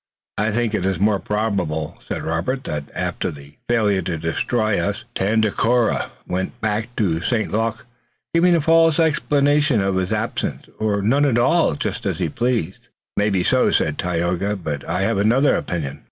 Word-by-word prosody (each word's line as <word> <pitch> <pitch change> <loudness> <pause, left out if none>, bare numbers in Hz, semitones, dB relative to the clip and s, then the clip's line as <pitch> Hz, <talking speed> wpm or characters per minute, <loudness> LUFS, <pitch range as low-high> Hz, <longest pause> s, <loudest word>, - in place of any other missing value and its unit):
"I 105 +2 +2
think 115 0 0
it 95 -3 0
more 100 0 +2
probable," 95 -9 -2
said - - -4
Robert, 85 +12 -2
"that 75 - -4
after - - -2
the 70 0 -12
failure 105 -5 +2
to 85 -1 -3
destroy 105 +7 0
us 105 +4 -2
Tandakora 110 +3 +1 0.2
went 95 +6 -3
back 110 +2 -2
to 85 -7 0
St. 110 +4 -1
Luc, 115 +1 -1 0.5
giving 175 +1 +4
a 165 - +2
false 165 +1 +4
explanation 145 -4 +2
of 95 -1 0
his 95 +1 -1
absence 110 +1 -2
or 105 -2 0
none 135 +8 +3
at 120 -4 +2
all, 130 - +3
just - - -3
as - - -1
he - - -1
pleased." 115 -7 -2
"It - - -33 0.3
may 105 +1 +2
be 95 -3 +1
so," - - +3
said 75 -1 0
Tayoga, 90 +3 -1
"but 75 -7 -4
I 90 +3 0
have 110 0 +1
another 120 +8 +3
opinion." 75 -6 -3
105 Hz, 170 wpm, -21 LUFS, 90-120 Hz, 0.5 s, giving